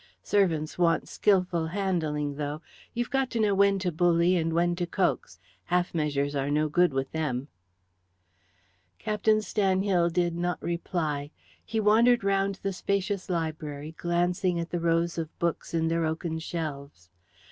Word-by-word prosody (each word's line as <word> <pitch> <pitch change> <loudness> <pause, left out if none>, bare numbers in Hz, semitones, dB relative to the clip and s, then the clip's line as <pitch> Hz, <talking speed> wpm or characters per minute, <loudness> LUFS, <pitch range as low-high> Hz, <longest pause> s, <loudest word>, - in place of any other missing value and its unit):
Servants 170 -6 +1
want 170 -2 +2
skilful 180 -5 +1
handling, 160 -6 -1
though. 145 +1 -4 0.4
You've 240 +2 -2
got 270 -2 +1
to 235 - -2
know 210 -2 +3
when 200 0 +4
to 185 -2 -1
bully 175 +2 +3
and 165 -1 0
when 175 +1 +2
to 175 -1 -1
coax. 175 - -1 0.3
Half 180 0 0
measures 145 -3 0
are 140 0 -1
no 150 +1 +2
good 175 +3 +3
with 135 0 -2
them." 145 -4 -2 1.5
Captain 215 - +1
Stanhill 190 -4 +2
did 175 0 0
not 175 +1 -1
reply. 160 -4 -2 0.3
He 225 0 -2
wandered 225 +2 +4
round 195 0 +1
the 195 -1 -1
spacious 200 +1 -2
library, 155 -3 -3
glancing 175 +1 0
at 170 0 -4
the 175 - -1
rows 170 0 +1
of 160 -1 -6
books 170 -1 -2
in 165 -1 +1
their 165 0 +1
oaken 160 +1 -2
shelves. 140 - -6
170 Hz, 150 wpm, -27 LUFS, 155-190 Hz, 1.5 s, when